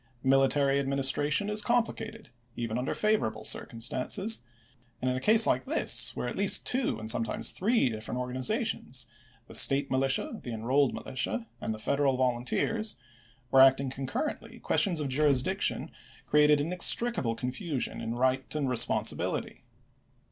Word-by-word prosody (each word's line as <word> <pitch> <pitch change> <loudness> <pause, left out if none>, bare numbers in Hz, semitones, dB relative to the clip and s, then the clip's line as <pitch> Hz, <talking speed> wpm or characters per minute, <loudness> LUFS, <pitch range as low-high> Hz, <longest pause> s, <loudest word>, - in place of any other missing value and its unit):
Military 135 +1 +3
administration 140 +5 +1
is 210 0 0
complicated, 230 -1 -2 0.3
even 115 -2 -3
under 125 - -2
favorable 110 - 0
circumstances, 130 - -1 0.6
and 130 0 0
in - - -1
a - - -2
case 220 - +6
like 130 +1 +1
this, 125 +1 0
where - - -3
at 120 - -4
least 200 0 +2
two, 250 - 0
and 110 +1 0
sometimes 115 -1 -1
three, 220 - +1
different 110 +2 -4
organi2;ations, 125 0 -1 0.2
— - - -31
the - - -12
State 135 0 +3
Militia, 135 0 0
the 120 - -7
En 110 -1 -6
rolled 135 +2 +2
Militia, 130 - -3
and - - -3
the 110 - -4
Federal 135 +3 0
Volunteers, 130 - 0 0.3
— 120 +1 -32
were 135 - +6
acting 135 0 +5
concurrently, 135 - -4
questions 180 -7 +1
of 150 - -2
jurisdiction 135 -1 +1 0.3
cre 150 - 0
ated 150 0 +5
inextricable 175 - 0
confusion 130 +4 -4
in 115 +1 -4
right 130 +3 0
and 145 -3 -1
responsi 115 -2 0
bility. - - -4
135 Hz, 150 wpm, -29 LUFS, 125-155 Hz, 0.6 s, case